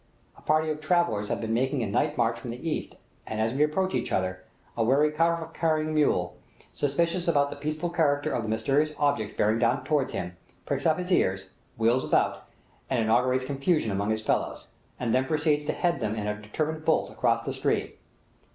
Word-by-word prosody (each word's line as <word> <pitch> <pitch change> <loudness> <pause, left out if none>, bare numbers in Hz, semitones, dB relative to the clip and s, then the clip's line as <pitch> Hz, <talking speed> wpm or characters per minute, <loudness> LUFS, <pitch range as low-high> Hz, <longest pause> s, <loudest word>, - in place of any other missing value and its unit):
A - - -18
party 155 0 +2
of 155 0 -5
travellers 155 - +1
have - - -1
been 110 0 -2
making 130 +2 0
a - - 0
night 145 +9 0
march 115 -1 +1
from 120 - -7
the 125 +7 -6
east, 155 - -3 0.3
and 110 - -4
as 110 +2 +1
we 140 - -1
approach 185 +5 +1
each - - -1
other, 95 0 -1 0.3
a 115 - +1
wary 140 +6 +3
kafaveh 165 +1 0
carrying 155 -1 0
mule, 115 -13 +1 0.4
suspicious 170 +5 0
about 145 -3 +2
the - - -5
peaceful 155 +4 -3
character 150 -3 +1
of 120 - 0
the 110 - -4
mysterious 135 +8 +1
object 140 -8 0
bearing 110 +2 +2
down 120 +3 +2
toward 145 -4 +1
him, 90 - -5 0.3
pricks - - -1
up 160 - +3
his 180 +1 -4
ears, 95 - +1 0.3
wheels 115 +3 +1
round, - - +2 0.5
and 130 - +1
inaugurates 125 +3 +2
confusion 140 - 0
among 100 +2 -1
his 110 0 -1
fellows, - - -1 0.3
and 120 -3 0
then 130 +1 +3
proceeds 150 0 +1
to - - 0
head 170 -5 0
them 110 -2 -2
in 105 -2 -3
a 105 0 -3
determined 155 +9 -3
bolt 160 0 +1
across - - +1
the - - -2
stream. - - 0
140 Hz, 200 wpm, -27 LUFS, 110-155 Hz, 0.5 s, wary